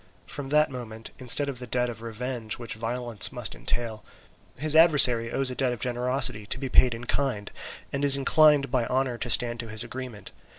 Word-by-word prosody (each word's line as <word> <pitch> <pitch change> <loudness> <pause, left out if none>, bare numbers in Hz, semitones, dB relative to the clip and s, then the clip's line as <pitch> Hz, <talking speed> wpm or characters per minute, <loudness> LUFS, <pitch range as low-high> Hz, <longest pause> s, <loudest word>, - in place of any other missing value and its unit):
From 140 -2 -8
that 150 0 +2
moment, 115 -3 -9
instead 130 +3 +4
of 135 -3 -5
the 125 - -8
debt 125 +1 0
of 115 -2 -8
revenge 115 0 -5
which 120 -2 -7
violence 115 0 -2
must - - -3
entail, 115 -3 -3 0.5
his 155 +3 +1
adversary 140 -8 +5
owes 135 -1 +1
a - - -6
debt 130 -2 0
of 120 - -8
generosity 125 -3 -1
to - - -2
be 135 0 -5
paid 125 -1 +4
in 115 - -10
kind, 125 -7 -3 0.4
and 140 0 -2
is 140 -1 +7
inclined 145 -1 +3
by 125 -3 0
honour 130 -2 -1
to 120 - -3
stand 120 0 +2
to 115 -1 -6
his 110 0 -4
agreement. 120 -4 -8
125 Hz, 200 wpm, -26 LUFS, 115-135 Hz, 0.5 s, is